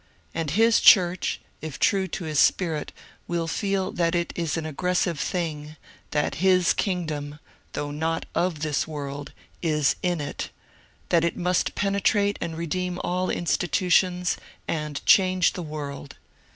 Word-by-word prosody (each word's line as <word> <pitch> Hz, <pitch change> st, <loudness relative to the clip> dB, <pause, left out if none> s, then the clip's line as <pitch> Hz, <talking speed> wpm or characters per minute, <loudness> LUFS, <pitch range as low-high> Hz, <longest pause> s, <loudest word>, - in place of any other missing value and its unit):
And 165 Hz, -2 st, -2 dB
his 225 Hz, +8 st, +4 dB
church, 180 Hz, -3 st, +5 dB, 0.2 s
if 155 Hz, -4 st, -6 dB
true 195 Hz, -1 st, +2 dB
to 180 Hz, -, -5 dB
his 155 Hz, -2 st, -1 dB
Spirit, 160 Hz, -5 st, +2 dB, 0.4 s
will 170 Hz, -1 st, -1 dB
feel 195 Hz, +2 st, -1 dB
that 170 Hz, 0 st, 0 dB
it 170 Hz, 0 st, -1 dB
is 165 Hz, -2 st, -1 dB
an 160 Hz, -, -3 dB
aggres 180 Hz, +4 st, -1 dB
sive 170 Hz, -5 st, 0 dB
thing; 155 Hz, -4 st, -3 dB, 0.3 s
that 150 Hz, -1 st, -1 dB
his 185 Hz, -2 st, +4 dB
kingdom, 155 Hz, -6 st, -2 dB, 0.4 s
though 145 Hz, 0 st, -3 dB
not 160 Hz, +2 st, -2 dB
of 170 Hz, -4 st, 0 dB
this 155 Hz, 0 st, 0 dB
world, 145 Hz, -2 st, -6 dB, 0.3 s
is 155 Hz, -3 st, +2 dB
in 175 Hz, -2 st, 0 dB
it; 145 Hz, -1 st, -4 dB, 0.6 s
that 170 Hz, -1 st, +3 dB
it 170 Hz, -, 0 dB
must 180 Hz, 0 st, 0 dB
penetrate 200 Hz, 0 st, +1 dB
and 160 Hz, -1 st, -4 dB
redeem 180 Hz, +2 st, -2 dB
all 180 Hz, +1 st, -1 dB
institutions, 180 Hz, +1 st, +1 dB, 0.3 s
and 150 Hz, -2 st, -3 dB
change 185 Hz, -2 st, +5 dB
the 180 Hz, -, -5 dB
world. 145 Hz, -3 st, -6 dB
170 Hz, 145 wpm, -25 LUFS, 150-180 Hz, 0.6 s, church